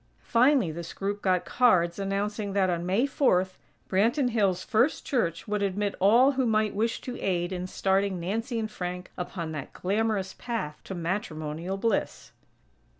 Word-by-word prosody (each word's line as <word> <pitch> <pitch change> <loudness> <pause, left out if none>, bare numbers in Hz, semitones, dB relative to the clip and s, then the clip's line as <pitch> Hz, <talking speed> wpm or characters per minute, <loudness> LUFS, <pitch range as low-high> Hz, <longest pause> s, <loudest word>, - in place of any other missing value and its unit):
Finally 250 - +4
this 170 +1 -7
group 200 +1 -3
got 185 -2 +1
cards 175 -5 +3
announcing 200 +1 -2
that 190 -2 +2
on 175 0 -2
May 200 +8 +2
Fourth, 190 -10 +1 0.3
Branton 240 +7 +2
Hills' 195 -5 +1
First 235 +7 +1
Church 225 - -1
would 210 0 -1
admit 200 +1 0
all 235 +8 +6
who 260 -2 0
might 215 -1 +2
wish 225 +3 0
to 245 -1 -6
aid 175 -1 0
in 180 0 -3
starting 190 0 0
Nancy 225 +8 -2
and 220 -1 -2
Frank 180 -1 -5
upon 175 -2 -5
that 145 -3 -6
glamorous 200 0 -1
path 225 -12 -4
to 190 - -5
matrimonial 170 -1 -3
bliss. 225 0 -1
195 Hz, 155 wpm, -27 LUFS, 180-225 Hz, 0.3 s, all